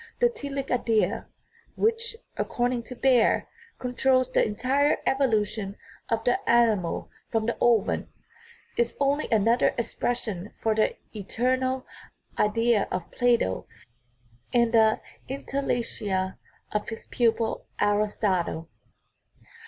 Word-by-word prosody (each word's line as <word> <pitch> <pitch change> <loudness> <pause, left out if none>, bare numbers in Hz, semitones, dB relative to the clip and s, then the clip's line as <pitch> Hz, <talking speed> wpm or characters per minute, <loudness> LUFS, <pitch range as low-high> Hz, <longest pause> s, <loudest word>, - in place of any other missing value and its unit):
The 485 0 +4
"telic 280 - -5
idea" 230 -3 +1 0.5
which, 455 +1 +1 0.2
accord 245 +1 0
ing 240 - -2
to 250 - -8
Baer, 255 -2 +3 0.3
controls 255 0 +1
the - - +3
entire 260 +7 +2
evolution 215 -6 0 0.3
of 225 -1 0
the 245 - +2
ani 230 -4 +5
mal 170 - -4 0.2
from 225 -2 0
the 235 - 0
ovum, 235 -4 +2 0.7
is 235 0 0
only 280 +2 +1
another 230 +2 +3
expression 220 -5 -2
for 220 - +1
the 215 0 +1 0.2
eternal 255 +5 0 0.3
" - - -34
idea 230 0 +2
" - - -28
of 180 -2 -4
Plato 240 - +1 0.8
and 235 -1 +3
the 220 -1 +4 0.3
entelecheia 235 -8 -2 0.3
of 210 - -2
his 225 - -7
pupil 230 -1 0
Aristotle. 205 -5 0
235 Hz, 115 wpm, -26 LUFS, 210-255 Hz, 0.8 s, ani